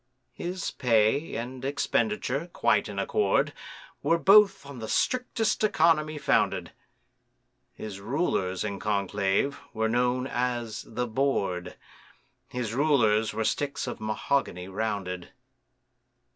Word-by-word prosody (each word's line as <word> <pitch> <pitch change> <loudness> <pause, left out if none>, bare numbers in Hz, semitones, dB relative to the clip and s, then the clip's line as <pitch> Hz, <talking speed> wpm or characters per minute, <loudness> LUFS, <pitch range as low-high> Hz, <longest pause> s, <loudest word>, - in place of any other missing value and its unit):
His 180 +2 -4
pay 115 +4 +2
and 125 +2 -5
expenditure, 145 - -1
quite - - +2
in - - -7
accord, 425 -1 +1 0.5
Were 165 - +3
both 195 0 +5
on 140 -3 -9
the 110 - -5
strictest 250 - 0
economy 160 -6 +3
founded; - - +1 1.0
His 105 -3 -7
rulers, 100 - -1
in 100 -2 -4
conclave, 100 +5 0 0.2
were 110 0 +1
known 125 +2 +1
as 120 -3 -2
the 125 +2 -2
Board, 105 -8 -1 0.7
His 120 -3 -4
rulers 115 -6 +3
were 110 - -2
sticks 140 +4 -1
of - - -6
mahogany 110 -3 -1
rounded. 95 -3 -3
125 Hz, 110 wpm, -27 LUFS, 105-150 Hz, 1.0 s, both